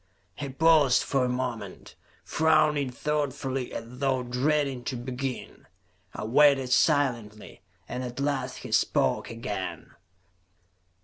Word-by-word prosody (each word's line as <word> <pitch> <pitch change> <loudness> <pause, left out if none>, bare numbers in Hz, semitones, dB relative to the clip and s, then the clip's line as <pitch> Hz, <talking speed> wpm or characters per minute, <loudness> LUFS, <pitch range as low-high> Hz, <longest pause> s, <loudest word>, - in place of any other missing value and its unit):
He 140 +8 -6
paused 150 -2 +4
for 135 -2 0
a - - -1
moment, 125 -6 -4 0.3
frowning 155 -3 +2
thoughtfully 135 -2 -2
as 115 +2 -8
though 135 -2 +1
dreading 135 +1 0
to 130 - -3
begin. 125 +1 -6 0.5
I - - -5
waited 135 +2 +4
silently, 125 -8 +1 0.3
and 125 +1 -4
at 125 +1 -6
last 140 -2 -2
he - - -7
spoke - - +1
again. - - -5
130 Hz, 115 wpm, -27 LUFS, 125-145 Hz, 0.5 s, paused